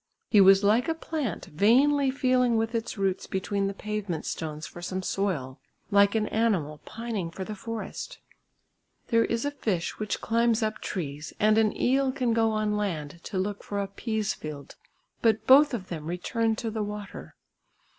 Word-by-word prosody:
He 210 - +7
was 195 +1 +7
like 215 +4 +3
a 325 - 0
plant 305 - -3
vainly 265 - +3
feeling 255 -3 +2
with 225 +1 -1
its 230 -1 -3
roots 195 -1 -1
between 195 +1 -1
the 200 - -3
pavement 205 -6 -4
stones 155 0 -4
for 175 - -10
some 185 +2 -3
soil; 165 -11 -2 0.3
like 200 +1 +5
an 215 -1 +2
animal 185 -10 0
pining 225 -6 -4
for 190 +3 -6
the 215 - -5
forest. 225 +2 -6 0.9
There 230 0 +4
is 230 +3 -1
a 285 - 0
fish 195 -11 -2
which 215 -1 -2
climbs 230 0 +2
up 215 0 -2
trees, 150 -4 -5
and 215 +1 +4
an 215 -1 +1
eel 265 +1 +2
can 250 -3 0
go 225 -1 +3
on 215 -1 0
land 170 -7 -3
to 195 - -4
look 200 +2 -2
for 205 - -3
a 200 - -1
pease 215 +1 -2
field, 150 -2 -8 0.5
but 220 -2 +2
both 285 +3 +7
of 210 -7 -5
them 155 -3 -5
return 220 +6 0
to 225 0 -4
the 220 0 -3
water. 210 -1 -6
210 Hz, 175 wpm, -27 LUFS, 190-230 Hz, 0.9 s, He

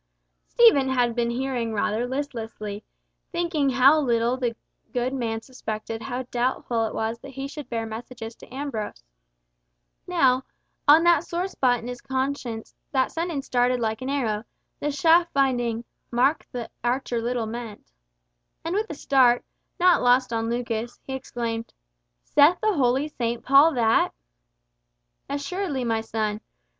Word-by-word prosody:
Stephen 360 - +5
had 245 -2 +2
been 235 0 0
hearing 240 -2 -2
rather 215 +3 0
listlessly, 225 -6 -5 0.5
thinking 340 -5 0
how 270 +4 +6
little 240 -3 +1
the 245 -3 -2 0.4
good 250 +1 0
man 230 -4 -2
suspected 225 -3 -5
how 255 0 -4
doubtful 240 -2 0
it - - -7
was 225 +1 -2
that 275 - -10
he 270 +1 -5
should 285 -2 -8
bear 230 -1 -2
messages 225 +1 -7
to - - -16
Ambrose. 255 - -5 1.0
Now, 265 -8 +3 0.5
on 310 +3 +8
that 340 -3 +5
sore 350 +2 -2
spot 255 -9 +2
in 235 - -8
his 245 -1 -6
conscience, 260 -4 -3 0.2
that 265 -2 +1
sentence 330 -4 -3
darted 250 0 +2
like 220 -1 -1
an 260 - -3
arrow, 225 -7 -1 0.4
the 295 - -1
shaft 330 +4 +4
finding 245 -4 +1 0.3
"mark 265 +6 +2
the 245 -2 -5
archer 240 -1 0
little 240 0 -1
meant," 220 - -7 0.7
and 330 - -1
with 425 +3 -1
a 315 - -5
start, 255 -4 +3 0.3
not 360 0 +5
lost 245 0 +3
on 225 0 -1
Lucas, 235 -1 -3
he 265 - -6
exclaimed 235 -3 -4 0.5
"Saith 300 +5 +5
the 430 -1 +2
holy 270 -1 +2
Saint 235 -5 -3
Paul 280 +4 +6
that?" 225 - +3 1.1
"Assuredly, 285 0 -2
my 225 -2 0
son. 215 -1 -2
250 Hz, 145 wpm, -25 LUFS, 230-280 Hz, 1.1 s, on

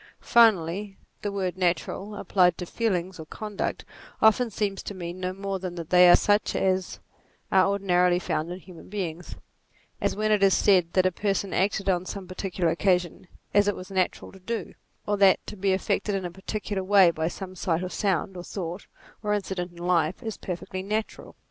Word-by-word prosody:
Finally, 200 -3 +4 0.2
the 205 - -2
word 190 -3 -2
natural, 185 +3 -1
applied 180 -4 +2
to 180 - -5
feelings 185 -4 -2
or 160 - -7
conduct, 210 +2 -4 0.3
often 230 +2 +4
seems 200 -2 -2
to 200 - -7
mean 175 0 -6
no 185 0 -2
more 195 0 -4
than 180 -1 -5
that 170 -2 -7
they 180 0 +8
are - - +9
such 205 +1 +2
as 185 -1 0 0.5
are 190 0 +5
ordinarily 180 -3 +2
found 170 -2 -2
in 180 - -6
human 180 -1 -14
beings; 175 -4 -5 0.7
as - - 0
when 215 +1 0
it 210 -1 +3
is 195 -1 +5
said 180 -5 +3
that 185 -1 +3
a 185 - +3
person 195 +1 -1
acted, 200 +1 0
on 180 -2 +2
some 190 0 -7
particular 185 -2 -1
occasion, 180 0 0 0.3
as 205 0 +4
it 205 - +1
was 185 +2 -9
natural 185 -1 -1
to 190 - -15
do; 230 +5 -4 0.3
or 205 0 0
that 195 -1 +5
to 210 - -7
be 195 0 0
affected 195 +2 0
in 190 -2 -2
a 175 - -4
parti 190 +4 -5
cular 200 -2 -3
way 190 -2 +6
by 160 -1 -2
some 185 +1 -7
sight, 175 -1 -1
or 185 - -3
sound, 190 -1 -1
or 175 - -6
thought, 180 0 -6 0.3
or 210 -1 0
incident 190 -3 -3
in 175 - -18
life, 175 +3 +1
is 220 -2 -4
perfectly 185 +1 -5
natural. 215 +3 -4
190 Hz, 195 wpm, -26 LUFS, 180-200 Hz, 0.7 s, are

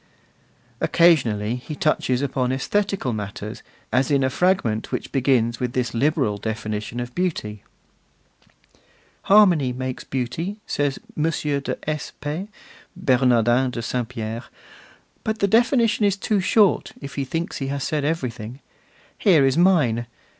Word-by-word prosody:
Occasionally 120 -10 +3
he 150 +5 -7
touches 140 -4 +1
upon 130 -2 0
aesthetical 195 - -1
matters, 105 +1 -6 0.3
as 130 +1 +2
in 140 -2 +3
a 130 - +1
fragment 180 - +1
which - - -4
begins 125 -4 +1
with 125 -1 -2
this 125 -1 -1
liberal 130 -4 +1
definition 110 +1 -4
of 120 0 -5
beauty: 115 - -3 1.6
Harmony 180 -10 +5
makes 130 0 -4
beauty, 145 - -3
says 145 -2 -1 0.2
M. 155 +2 +1
de 145 -4 -2
S. 155 -1 -3
P. 155 +7 -4 0.5
(Bernardin 125 - +3
de 120 -2 -5
St. 120 0 -2
Pierre), 115 -1 -5 0.8
but 220 0 -1
the 200 - +2
definition 230 0 +3
is 200 -1 +2
too 205 +1 0
short, 200 +1 +3
if 140 -1 -8
he 140 - -2
thinks 165 +6 -3
he 135 - -3
has 140 0 -3
said 150 0 -1
everything. 125 -6 -3 0.6
Here 165 -10 +5
is 135 0 +2
mine. 150 -11 +3
135 Hz, 135 wpm, -23 LUFS, 120-165 Hz, 1.6 s, Harmony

